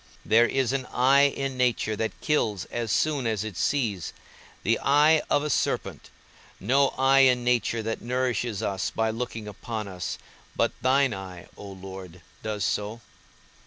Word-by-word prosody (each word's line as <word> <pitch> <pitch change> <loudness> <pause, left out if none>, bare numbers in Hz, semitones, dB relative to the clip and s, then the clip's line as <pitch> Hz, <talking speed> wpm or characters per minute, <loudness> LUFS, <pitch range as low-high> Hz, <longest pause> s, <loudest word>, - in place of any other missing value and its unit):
There 115 +2 +5
is 135 -2 0
an 130 -2 -2
eye 135 +3 +4
in 135 -1 -4
nature 120 -3 +1
that 110 +1 -3
kills 105 -10 0
as 120 -2 -2
soon 145 -3 +1
as 110 -2 -1
it 110 -4 -6
sees, 110 -7 -1 0.5
the 115 +2 +2
eye 150 +3 +4
of 145 - +2
a 150 - -2
serpent; - - -2 0.5
no 135 +7 +3
eye 135 +1 +4
in 125 -2 +5
nature 120 -2 +1
that 110 0 -3
nourishes 120 -3 -1
us 95 -1 -1
by 110 0 0
looking 115 -2 -5
upon 105 +1 -5
us; 90 -2 -5 0.4
but - - +2
thine 135 -1 +3
eye, 95 -2 -9
O 100 - -10
Lord, 95 -2 -10 0.2
does 105 -4 -2
so. 105 +6 -2
115 Hz, 160 wpm, -26 LUFS, 105-130 Hz, 0.5 s, There